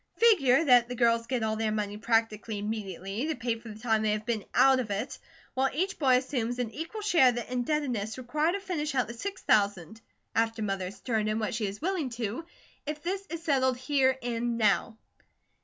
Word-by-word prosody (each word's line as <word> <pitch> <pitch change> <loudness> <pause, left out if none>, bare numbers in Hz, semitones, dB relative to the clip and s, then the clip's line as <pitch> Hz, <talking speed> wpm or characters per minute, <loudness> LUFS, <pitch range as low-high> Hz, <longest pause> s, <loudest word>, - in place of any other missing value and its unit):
Figure 330 - +5
that 245 -3 +5
the 245 - -4
girls 230 -1 +2
get 250 -2 -1
all 220 0 0
their 220 -1 0
money 205 -1 -2
practically 225 -1 0
immediately, 205 - -4
to 320 - -1
pay 235 -2 -2
for 230 0 -11
the 210 - -9
time 220 -1 +1
they 215 -1 +1
have 215 0 -3
been 230 -4 -1
out 265 -1 +6
of 240 -4 -3
it; 200 0 -3 0.3
while 265 +1 +2
each 375 +7 -2
boy 260 -4 +5
assumes 250 -2 -2
an 245 -3 -2
equal 330 - -6
share 345 -11 +5
of 245 - -1
the 240 +1 -5
indebtedness 245 -5 -1
required 300 +7 0
to 400 - -1
finish 305 -7 -3
out 250 -4 +2
the 235 - -6
six 390 +11 -6
thousand, 205 0 +1 0.3
after 225 0 0
Mother 195 -2 -2
has 185 - -8
turned 220 -3 0
in 215 - 0
what 220 -1 -2
she 220 -2 -1
is 200 +5 -7
willing 355 -7 -1
to, 230 +6 -3 0.4
if 300 0 -4
this 385 +3 -3
is 335 -1 -6
settled 260 -5 +2
HERE 260 0 +2
AND 235 0 -1
NOW." 220 +1 +2
240 Hz, 210 wpm, -29 LUFS, 220-275 Hz, 0.4 s, out